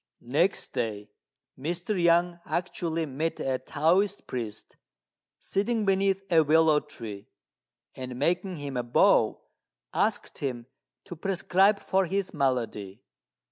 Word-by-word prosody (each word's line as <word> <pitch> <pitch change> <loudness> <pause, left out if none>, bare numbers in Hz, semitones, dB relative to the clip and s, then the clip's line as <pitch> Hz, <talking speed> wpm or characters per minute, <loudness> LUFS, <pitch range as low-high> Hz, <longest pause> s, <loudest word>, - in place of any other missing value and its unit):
Next 175 +7 +2
day, 105 -3 -3 0.5
Mr. 175 +8 -2
Yang 170 +1 +3
actually 165 -2 -2
met 155 +3 -3
a 130 -1 -1
Taoist 180 +7 +1
priest 110 -4 -6 0.6
sitting 215 +2 -1
beneath 195 0 +2
a 165 -1 +6
willow 155 0 +4
tree; 110 -9 -9 0.7
and, 130 -1 -6
making 180 +6 0
him 140 -4 -5
a - - +1
bow, 120 0 +3 0.5
asked - - -1
him 125 -4 -3 0.4
to 180 - -8
prescribe 195 +3 +2
for 190 -1 +1
his 195 +2 -2
malady. 120 -8 -2
160 Hz, 115 wpm, -28 LUFS, 130-185 Hz, 0.7 s, a